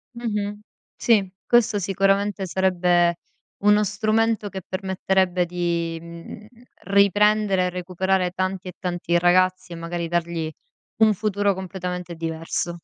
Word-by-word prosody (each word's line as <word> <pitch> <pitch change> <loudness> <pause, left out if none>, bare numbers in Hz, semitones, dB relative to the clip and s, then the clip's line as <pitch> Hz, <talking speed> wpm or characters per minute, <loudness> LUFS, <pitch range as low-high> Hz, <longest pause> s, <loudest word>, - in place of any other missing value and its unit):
Mh-mh. 210 -3 -3 0.4
Sì, 205 -5 +2 0.2
questo 230 -3 +3
sicuramente 195 +1 +1
sarebbe 175 -2 +2 0.5
uno 210 0 +5
strumento 215 +1 0
che 190 -1 -6
permetterebbe 190 -1 0
di, 170 -1 -2
mhmm, 170 +5 -10 0.4
riprendere 200 0 +3
e - - 0
recuperare 180 0 -1
tanti 185 0 -3
e 180 - -9
tanti 175 -2 -1
ragazzi 185 0 +2
e - - -6
magari 170 0 -4
dargli 170 -1 -2 0.5
un 220 -1 +5
futuro 205 0 0
completamente 180 -2 -5
diverso. 165 +1 -3
185 Hz, 115 wpm, -23 LUFS, 175-205 Hz, 0.5 s, uno